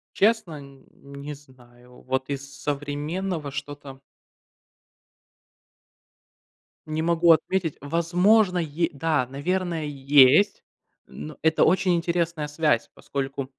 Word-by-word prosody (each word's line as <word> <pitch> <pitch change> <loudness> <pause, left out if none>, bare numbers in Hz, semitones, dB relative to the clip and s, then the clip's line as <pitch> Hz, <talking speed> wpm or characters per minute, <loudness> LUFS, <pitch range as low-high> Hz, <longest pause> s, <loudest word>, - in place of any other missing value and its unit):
Честно, 195 -8 +1
нь 140 -1 -16
не 140 +1 -9
знаю. 125 -3 -19
Вот 130 +1 -3
из 140 0 -5
с 140 0 -14
современного 145 +3 -3
что-то 140 -1 -8 2.9
не 155 +1 -2
могу 170 0 +4
отметить. 165 -1 0
Возможно, 180 +6 +2
е 165 0 -1
да, 150 -2 0
наверное, 165 +4 -2
есть. 145 +6 +4 0.4
Ну, 75 +1 -9
это 160 +1 +3
очень 185 +1 +2
интересная 170 -2 -1
связь, 150 +1 0
поскольку, 135 0 -4
150 Hz, 100 wpm, -24 LUFS, 140-170 Hz, 2.9 s, могу